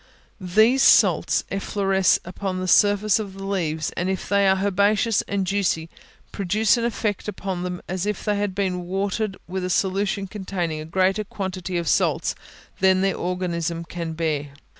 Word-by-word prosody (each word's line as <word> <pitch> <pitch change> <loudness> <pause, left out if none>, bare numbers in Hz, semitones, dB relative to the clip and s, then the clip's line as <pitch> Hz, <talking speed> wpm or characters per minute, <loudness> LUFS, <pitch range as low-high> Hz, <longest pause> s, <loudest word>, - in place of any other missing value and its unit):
These 215 +8 +3
salts - - +4
effloresce 195 -1 +2
upon 185 +1 -4
the 185 - -3
surface 205 +2 +4
of 200 -3 -6
the 195 - -8
leaves, 160 -6 -2
and 180 +2 -2
if 190 -1 -3
they 200 -1 +3
are 190 - +5
herbaceous 205 +2 +2
and 200 -1 -1
juicy, 180 -4 -1 0.4
produce 205 +2 +2
an 235 -1 -1
effect 215 -4 -2
upon 195 -3 -4
them 180 0 -5
as 185 +2 -3
if 210 - -3
they 210 -1 +1
had 200 -2 -2
been 185 -3 -1
watered 195 +2 -2
with 185 +1 -4
a 180 - -2
solution 195 +2 0
containing 185 -5 -4
a 155 - -6
greater 190 +5 +1
quantity 190 -3 -4
of 170 -1 -2
salts - - +1 0.5
than 190 0 +4
their 195 0 +1
organism 170 -2 -2
can 165 -1 -5
bear. 150 -3 -2
190 Hz, 165 wpm, -23 LUFS, 180-200 Hz, 0.5 s, are